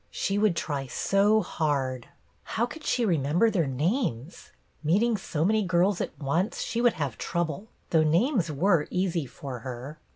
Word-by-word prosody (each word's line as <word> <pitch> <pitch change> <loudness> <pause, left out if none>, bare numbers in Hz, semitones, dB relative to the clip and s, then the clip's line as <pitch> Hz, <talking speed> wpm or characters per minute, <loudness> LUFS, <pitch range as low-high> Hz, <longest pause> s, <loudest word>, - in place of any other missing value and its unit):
She 200 +1 -1
would 210 -4 +3
try 140 -4 -3
so 200 - +2
hard. 135 -7 -1 0.3
How 230 - -1
could 305 +5 -10
she 240 - +1
remember 170 +4 +2
their 170 -8 +1
names.'* 150 - -2 0.3
Meeting 210 +9 +3
so 165 -5 -2
many 215 +2 +3
girls 185 0 +2
at - - -4
once 165 +9 -1
she 235 - -2
would 240 -1 +4
have 140 -8 -4
trouble, 175 +4 -2 0.2
though 160 - +5
names 170 - +2
were 165 +1 +2
easy 180 -5 -1
for 125 0 -7
her. 130 +5 -7
170 Hz, 160 wpm, -27 LUFS, 145-210 Hz, 0.3 s, though